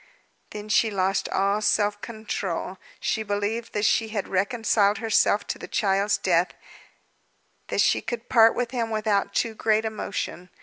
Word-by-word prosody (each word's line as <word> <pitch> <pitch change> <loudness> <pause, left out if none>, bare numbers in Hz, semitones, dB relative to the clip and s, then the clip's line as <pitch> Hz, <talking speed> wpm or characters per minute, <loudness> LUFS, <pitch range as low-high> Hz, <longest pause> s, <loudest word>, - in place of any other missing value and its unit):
Then 210 0 -8
she 220 +1 +3
lost 195 -1 0
all 200 +2 +1
self 205 0 +1
control. 195 -5 -4 0.2
She 220 - -1
believed 205 +2 -3
that 210 0 0
she 225 - +2
had 210 -2 -4
reconciled 205 +1 +1
herself 210 -1 +2
to - - -5
the - - -8
child's 200 0 +1
death, 175 -1 +1 1.1
that - - 0
she - - +3
could 240 -1 -5
part 225 -2 +5
with 240 -1 -2
him 235 -3 -2
without 210 -2 0
too 230 -2 0
great 220 0 +1
emotion. 200 -4 -4
210 Hz, 150 wpm, -25 LUFS, 200-225 Hz, 1.1 s, part